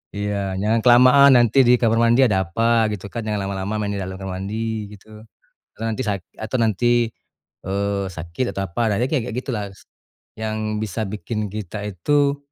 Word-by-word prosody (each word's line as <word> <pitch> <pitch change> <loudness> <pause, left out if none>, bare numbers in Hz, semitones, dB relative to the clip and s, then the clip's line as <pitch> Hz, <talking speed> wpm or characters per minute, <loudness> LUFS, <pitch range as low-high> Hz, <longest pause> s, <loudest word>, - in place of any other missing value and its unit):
iya. 105 0 -2 0.3
"Jangan 110 +3 +2
kelamaan, 130 +3 +7
nanti 120 +2 +2
di 125 - +6
kamar 115 -1 +2
mandi 120 +3 +4
ada 95 -3 +1
apa," 115 +5 +1
gitu, 100 -1 -6
kan. 115 - -3
"Jangan 105 -1 -1
lama-lama 100 +1 -3
main 105 -1 -2
di - - -3
dalam 95 0 -6
kamar 95 -1 -5
mandi," 110 0 -4
gitu. 105 0 -15 0.7
Atau, 115 - -7
"Nanti 110 +2 -3
sak 100 -3 -2 0.2
atau, 110 +3 -3
nanti, 120 +2 +2 0.6
eee, 100 +1 -1
sakit 85 +8 -3
atau 100 - -2
apa, 85 +6 -6
nah, 105 - +1
nanti," 125 - +2
kayak-kayak 120 -5 -1
gitulah 115 -6 -3
s 95 - -18 0.6
yang 110 -1 -2
bisa 110 +1 -3
bikin 105 +1 -4
kita 105 -1 -6
itu 140 - +1
110 Hz, 180 wpm, -21 LUFS, 100-115 Hz, 0.7 s, kelamaan